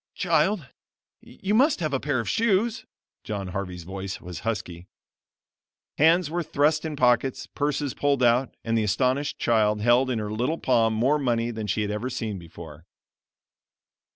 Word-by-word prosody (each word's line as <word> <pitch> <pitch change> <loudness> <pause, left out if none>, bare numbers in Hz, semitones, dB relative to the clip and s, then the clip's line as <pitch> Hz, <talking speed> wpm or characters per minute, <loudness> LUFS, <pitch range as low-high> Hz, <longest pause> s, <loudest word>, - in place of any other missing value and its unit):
"Child 170 0 +1 0.5
you 195 +2 -5
must 270 +5 +4
have 155 -4 -2
a 135 - +1
pair 140 -2 -1
of 115 - -4
shoes." 225 - +1 0.4
John 100 -3 -4
Harvey's 90 -2 -5
voice 95 +2 -6
was 90 -3 -8
husky. 100 -5 -4 1.1
Hands 165 +3 +5
were 170 +3 -2
thrust 155 0 +1
in 155 -2 -3
pockets, 125 -1 +2
purses 145 -2 -2
pulled 140 -2 +1
out, 120 +2 +2
and 115 0 -1
the 110 - +2
astonished 130 +7 0
child 105 -2 +2
held 120 +3 +3
in 125 - 0
her 105 -1 -3
little 125 +9 -1
palm 115 -6 +2
more 135 +7 +2
money 120 -3 0
than 110 -2 -5
she 105 +2 0
had 105 - -2
ever 105 +5 -3
seen 110 -6 -4
before. 80 -1 -12
120 Hz, 160 wpm, -25 LUFS, 105-150 Hz, 1.1 s, Hands